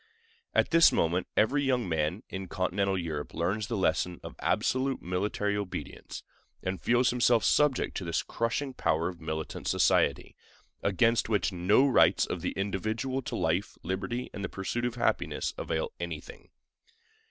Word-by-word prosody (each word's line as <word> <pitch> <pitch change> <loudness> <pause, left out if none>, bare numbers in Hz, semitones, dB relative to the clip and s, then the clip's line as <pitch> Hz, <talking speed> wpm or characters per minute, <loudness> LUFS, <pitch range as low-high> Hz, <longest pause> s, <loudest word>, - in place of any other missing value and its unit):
At - - +3
this 165 0 +7
moment 85 +2 +1
every 140 +7 +3
young 125 -5 +1
man 80 +4 -1
in 95 0 -6
Continental 95 +2 0
Europe 80 -4 -4
learns 100 +5 -1
the 115 - -2
lesson 90 -1 0
of - - -8
absolute 130 +6 0
military 100 +3 -1
obedience, 90 -8 -6 0.4
and 95 0 -3
feels 120 +1 +3
himself 120 -1 +3
subject 150 -3 +2
to - - -4
this 85 -1 -1
crushing 130 +4 -2
power 80 -8 0
of 85 -2 -10
militant 80 0 -4
society, - - +2 0.5
against 115 +4 +2
which 105 -1 +1
no 100 +10 +4
rights 130 - +4
of - - -4
the - - -2
individual 110 +7 -2
to - - -5
life, 85 +5 -1
liberty, 95 +7 -3
and 100 - -6
the 95 - -2
pursuit 115 +5 -3
of 120 -1 -2
happiness 120 - 0
avail - - -2
anything. - - -7
100 Hz, 155 wpm, -29 LUFS, 90-120 Hz, 0.5 s, this